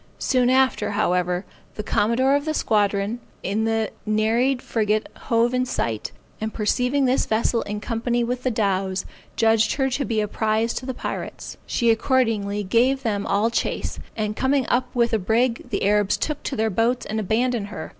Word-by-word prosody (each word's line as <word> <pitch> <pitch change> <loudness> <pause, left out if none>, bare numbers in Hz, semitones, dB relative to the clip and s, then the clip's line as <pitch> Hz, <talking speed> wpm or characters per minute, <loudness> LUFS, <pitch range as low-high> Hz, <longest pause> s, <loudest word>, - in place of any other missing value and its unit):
Soon 250 -2 +2
after, 260 -5 +2
however, 180 -2 0 0.3
the 210 - -4
commodore 235 +6 +2
of 285 +1 -1
the 310 0 -1
squadron 205 0 +1 0.2
in 210 +4 0
the 225 -1 0 0.2
Neried 230 +5 +2
frigate 215 -3 0 0.2
hove 235 +1 +2
in 255 0 +2
sight, 115 - -2 0.3
and 220 0 -2
perceiving 250 +6 +1
this 255 +1 +1
vessel 230 +1 +1
in 210 0 -3
company 235 +2 -1
with 245 +1 -2
the 255 - 0
dows, 195 -4 0 0.3
judged 225 -1 +3
her 270 -1 0
to 280 +3 0
be 225 -4 -1
a 210 - 0
prize 220 +2 0
to 255 - -5
the 260 - -3
pirates. - - -6
She 235 -1 +2
accordingly 225 -4 +1
gave 250 +7 +2
them 205 -4 -1
all 210 +4 +2
chase, - - -2 0.2
and 215 -1 -1
coming 265 +1 +1
up 250 +1 +2
with 235 -1 +2
the 220 - +2
brig, 230 +5 0
the 205 - -1
Arabs 205 -1 +2
took 300 -2 -3
to 275 - -4
their 220 0 0
boats 230 +5 +1
and 220 +1 -2
abandoned 220 +1 0
her. 210 - -7
225 Hz, 180 wpm, -23 LUFS, 210-250 Hz, 0.3 s, judged